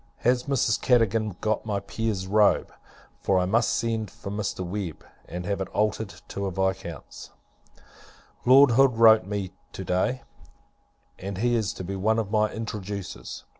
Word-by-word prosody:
Has 125 +1 +2
Mrs. 135 -6 +1
Cadogan 110 -5 +2
got 110 -1 0
my 105 -3 -2
Peer's 100 -1 -3
robe? 105 +2 +3 0.5
for 95 - +1
I 90 - +2
must 115 +5 +2
send 115 -3 -1
for 100 - -8
Mr. 100 -3 -3
Webb, 90 -3 -5 0.2
and 90 +1 -6
have 100 0 -2
it 95 - -2
altered 105 0 -1
to 100 0 -3
a - - -2
Viscount's. 95 -4 -4 1.1
Lord 135 +1 +7
Hood 125 0 +4
wrote 110 -1 +7
to - - -12
me, 100 -3 -3 0.2
to - - -6
day, 95 +8 0 1.0
and 95 0 -5
he 120 +4 +1
is 110 -5 +1
to - - -7
be 95 +2 -4
one 110 +4 +1
of 105 -3 -2
my 110 -1 +2
introducers. 100 -4 -6
105 Hz, 165 wpm, -26 LUFS, 95-115 Hz, 1.1 s, Lord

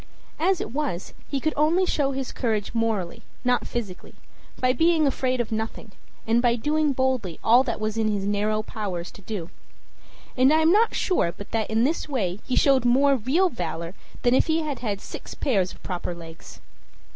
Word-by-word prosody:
As 360 +3 +2
it - - -4
was, 270 - -3 0.2
he 280 - -1
could 310 +3 0
only 320 +5 +3
show 285 -6 +1
his 265 -1 -4
courage 220 -5 -2
morally, 220 -6 -1 0.2
not 250 0 +2
physically, 205 -7 -6 0.4
by 255 0 +3
being 320 +3 +3
afraid 255 -2 0
of 235 -2 -2
nothing, 220 -1 -4 0.3
and 230 +2 +3
by 240 -1 +3
doing 300 +5 +1
boldly 260 - -1
all 240 +3 +6
that 235 - 0
it - - -12
was 215 0 -2
in 220 -1 +1
his 205 -2 -1
narrow 210 +1 0
powers 195 -7 -5
to - - -14
do. 185 -4 -6 0.8
And 260 +2 +5
I 315 +1 +4
am 320 +1 +5
not 440 +4 +3
sure 355 - +1
but 200 +4 -11
that 225 -1 -1
in 220 +1 +2
this 305 +3 0
way 200 -9 -1
he 255 - 0
showed 270 -3 +4
more 275 +3 +4
real 275 - +2
valor 170 - -4 0.3
than 245 - +4
if - - +3
he 320 0 +2
had 290 -5 -3
had 205 -4 -3
six - - -8
pairs 195 -9 +1
of - - -15
proper 180 -1 -4
legs. 165 -1 -12
240 Hz, 195 wpm, -25 LUFS, 205-280 Hz, 0.8 s, all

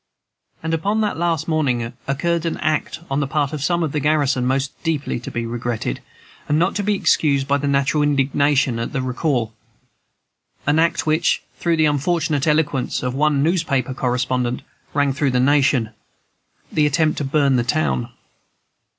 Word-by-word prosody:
And 165 0 -2
upon 200 +7 0
that 210 -1 0
last 165 -2 0
morning 130 -7 0
occurred 165 +5 0
an 165 - -2
act 155 +1 -1
on 135 - +1
the 140 - 0
part 145 +1 -1
of 150 - -4
some 170 +4 +1
of 155 - -1
the 150 - -1
garrison 140 -4 +1
most 135 +1 0
deeply 155 -6 -1
to 120 - -7
be 120 0 -3
regretted, 115 - -3 0.5
and 150 - +3
not 175 +4 +2
to 205 - -1
be 210 +1 +1
excused 140 -7 +2
by 140 0 +2
the 145 - -2
natural 140 +2 +2
indignation 140 -2 +2
at 115 - -4
their 135 - -1
recall, 125 -3 -1 1.1
an 150 +2 +3
act 165 +1 +1
which, 155 +1 +1 0.2
through 170 -1 +1
the 155 - +4
unfortunate 150 0 0
eloquence 150 -5 0
of 125 0 -1
one 145 0 +2
newspaper 155 -6 0
correspondent, 125 -1 -1 0.3
rang 145 -1 +2
through 140 0 0
the 125 -1 +1
nation, 130 -4 +3 0.8
the 150 -1 +3
attempt 155 +2 +1
to - - -1
burn 140 -1 +2
the 120 - +1
town. 75 - 0
145 Hz, 170 wpm, -21 LUFS, 130-155 Hz, 1.1 s, the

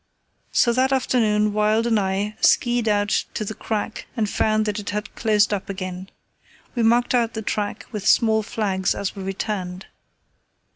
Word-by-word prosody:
So 235 - +3
that 260 +2 +2
afternoon 215 -5 +2
Wild 215 +2 +2
and 225 -2 +2
I 200 +2 -1
ski 240 -1 +4
ed 230 - -3
out 205 -1 +1
to 215 - -2
the 220 - -4
crack 215 +1 -4
and 220 -2 +1
found 215 +1 +1
that 210 0 -2
it 205 - -6
had 210 0 -4
closed 210 -2 +2
up 200 -1 -4
again. 185 -1 -5 0.6
We 240 - -1
marked 240 +2 +3
out 235 -2 +1
the 220 - -4
track 205 0 -3
with 210 -4 -4
small 220 -1 +4
flags 200 -4 -1
as 200 - -3
we 195 - -7
returned. 190 -1 -4
210 Hz, 175 wpm, -22 LUFS, 200-225 Hz, 0.6 s, ski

